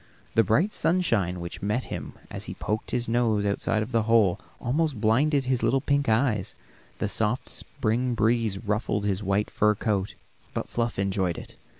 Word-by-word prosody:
The 115 - +5
bright 150 - +2
sunshine 115 - +1
which 85 0 -7
met 105 +5 0
him - - -6 0.2
as - - -4
he - - -6
poked 105 +1 -3
his 120 0 -1
nose 115 -3 +2
outside 110 +1 0
the 115 -2 +3
hole 110 -4 +3 0.2
almost 145 0 0
blinded 135 +6 +3
his 130 -1 +1
little 135 - +3
pink 140 -1 +1
eyes, 110 -4 +1 0.4
and - - -31
the - - +1
soft 110 +4 0
spring 120 +3 -1
breeze 110 -2 +2
ruffled 105 0 -1
his 100 -1 0
white 100 +1 0
fur 105 0 +3
coat, 100 -2 -1 0.4
but - - -2
Fluff 115 -1 -2
enjoyed 95 -3 0
it. - - -9
110 Hz, 175 wpm, -26 LUFS, 100-120 Hz, 0.4 s, The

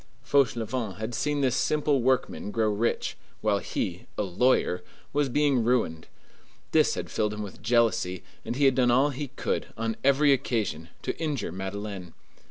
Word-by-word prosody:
Fauchelevent 120 -6 +1
had 110 +3 -4
seen 145 +5 0
this 130 -2 +2
simple 150 -2 +2
workman 130 -4 0
grow 110 0 +1
rich, 110 +3 -1 0.3
while 105 -2 +2
he, 90 -2 -4
a - - +1
lawyer, 95 -2 +2 0.3
was 145 -1 +2
being 140 -2 +2
ruined. 110 -10 0 0.6
This - - +4
had - - -5
filled 105 -1 0
him 105 - -4
with 100 - -9
jealousy, 115 -6 +1 0.2
and - - -3
he 140 +2 +3
had 135 - +6
done 125 -1 +3
all 135 +4 +4
he 140 +2 -4
could, - - -2
on 115 0 -1
every 140 +1 +5
occasion, 105 - -1
to - - -2
injure 150 - -2
Madeleine. 95 -1 -6
115 Hz, 165 wpm, -27 LUFS, 100-135 Hz, 0.6 s, had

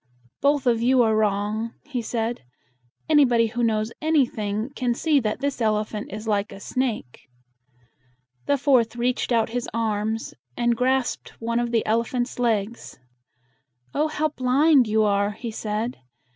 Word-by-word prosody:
"Both 285 -1 +2
of 235 -2 +2
you 250 +1 +4
are 220 -1 +2
wrong," 215 +2 0
he 270 -5 -3
said. 230 +1 -2 0.7
"Anybody 265 -7 +4
who 240 +2 -3
knows 215 -1 +1
anything 240 -7 0
can 245 -2 0
see 300 +1 +2
that 220 0 -2
this 280 -3 -2
elephant 215 -1 -1
is 215 +2 -7
like 205 -1 0
a 195 - -9
snake." 220 - -3 1.2
The 285 - +3
fourth 255 -5 +2
reached 245 +1 -1
out 230 -2 +2
his 245 +1 -3
arms, 220 0 -1 0.2
and 240 0 +2
grasped 255 +1 -1
one 235 +1 -1
of 240 0 -1
the 230 -1 +1
elephant's 235 +3 -1
legs. 230 -1 -1 1.0
"Oh, 305 +2 +1
how 310 0 -1
blind 270 0 +3
you 215 0 +2
are!" 200 0 +1
he 230 +2 -6
said. 220 +3 -3
235 Hz, 145 wpm, -24 LUFS, 215-255 Hz, 1.2 s, you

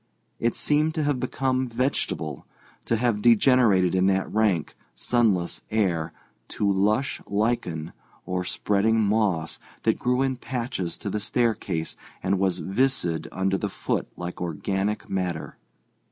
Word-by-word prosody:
It 115 0 +1
seemed 150 +1 +2
to 155 - 0
have 145 -3 +1
become 130 0 0
vegetable; 115 - -2 0.4
to 115 - +1
have 115 -2 +1
degenerated 115 -5 +5
in 95 0 +3
that 95 0 +1
rank, 105 -8 +1 0.2
sunless 105 -8 +1
air 90 -7 0 0.4
to 105 - -1
lush 105 +7 +1
lichen 100 -7 -1 0.3
or 90 0 -1
spreading 105 +4 +1
moss 100 -6 +1 0.2
that - - +2
grew 125 +2 +2
in 130 -1 0
patches 120 -8 -3
to 100 - -5
the 105 - -1
staircase 105 -7 -1 0.3
and 95 +1 +1
was 95 -2 +1
viscid 95 -5 0
under 95 0 0
the 105 - -2
foot - - -2
like 90 0 -6
organic 95 +5 -2
matter. 90 -4 -3
105 Hz, 135 wpm, -25 LUFS, 90-120 Hz, 0.4 s, degenerated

